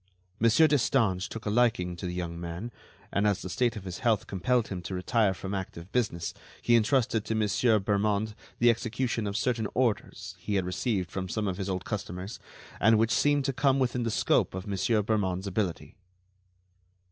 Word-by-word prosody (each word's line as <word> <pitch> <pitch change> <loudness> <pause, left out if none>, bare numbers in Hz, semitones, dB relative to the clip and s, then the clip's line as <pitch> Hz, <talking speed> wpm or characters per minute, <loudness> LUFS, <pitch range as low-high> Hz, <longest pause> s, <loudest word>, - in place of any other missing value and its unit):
Monsieur 115 +8 +5
Destange 115 -10 +2
took 115 - -7
a 105 - 0
liking 105 -7 +2
to 90 +1 -5
the 90 - -4
young 85 -2 -4
man, 85 +7 -5 0.4
and 100 +2 +2
as 100 -3 0
the 90 - -5
state 120 +2 +1
of 105 - -7
his 90 -2 -6
health 110 -4 +1
compelled 115 +5 0
him 95 -2 -4
to 95 +2 -5
retire 105 +3 +2
from 95 +2 -5
active 95 -2 -6
business, 95 -9 -1 0.3
he 120 - +3
entrusted 115 -1 +2
to 110 0 -2
Monsieur 110 +2 +3
Bermond 105 +1 0 0.2
the 120 0 +5
execution 115 -1 -2
of 100 +1 -2
certain 115 -1 0
orders 120 -3 -1
he 105 - -3
had 95 -2 +1
received 90 -1 -1
from 95 -1 -4
some 105 +4 -1
of 90 -2 -2
his 100 -1 -3
old 95 -1 -3
customers 95 -1 -5 0.4
and 110 +1 +5
which 115 +1 +2
seemed 145 -1 +3
to 135 - 0
come 135 +1 +2
within 125 -2 0
the 115 - 0
scope 105 - +1
of 95 - -5
Monsieur 105 +2 +1
Bermond's 95 -3 0
ability." 95 -2 -2
105 Hz, 190 wpm, -28 LUFS, 95-115 Hz, 0.4 s, Monsieur